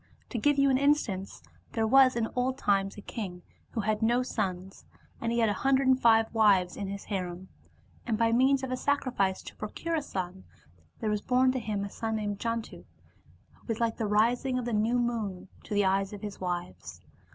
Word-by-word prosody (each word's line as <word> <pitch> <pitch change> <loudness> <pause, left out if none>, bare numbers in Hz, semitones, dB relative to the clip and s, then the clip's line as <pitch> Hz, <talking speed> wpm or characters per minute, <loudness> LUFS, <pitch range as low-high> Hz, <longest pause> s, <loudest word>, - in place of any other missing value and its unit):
To 240 - -3
give 290 +5 +3
you 275 0 +4
an 260 - +3
instance, 235 - 0 0.3
there 225 - +1
was 260 +2 +6
in 230 -1 0
old 255 +1 0
times 195 -4 +1
a - - -7
king 185 -5 -6 0.3
who 225 - -1
had 215 +1 -1
no 240 +3 +3
sons, 190 -5 -4 0.4
and 230 - -1
he 235 - 0
had 225 -2 +3
a - - +1
hundred 270 0 +3
and 260 0 +4
five 225 -2 +4
wives 200 -5 +4
in 200 - -4
his 200 +1 -6
harem. 185 -2 -5 0.6
And 225 -3 0
by 230 0 +2
means 265 +3 +3
of 260 - -3
a 255 - -1
sacrifice 250 -10 0
to - - -10
procure 330 +10 -4
a 320 - +1
son, 185 -7 -5 0.6
there 215 - 0
was 210 -1 -1
born 255 +2 +3
to 255 - -2
him 210 -3 -3
a - - -6
son 225 -1 -3
named 205 -2 -3
Jantu, 230 -1 -3 0.7
who - - -27
was 225 -2 -2
like 230 -1 0
the 220 - -1
rising 240 +5 +2
of 250 - -2
the 240 - -2
new 220 +3 +2
moon 220 -6 -2 0.2
to 210 - -4
the 205 -1 +3
eyes 195 +1 +1
of 205 - -9
his 205 -1 -6
wives. 95 - -5
220 Hz, 210 wpm, -29 LUFS, 195-250 Hz, 0.7 s, was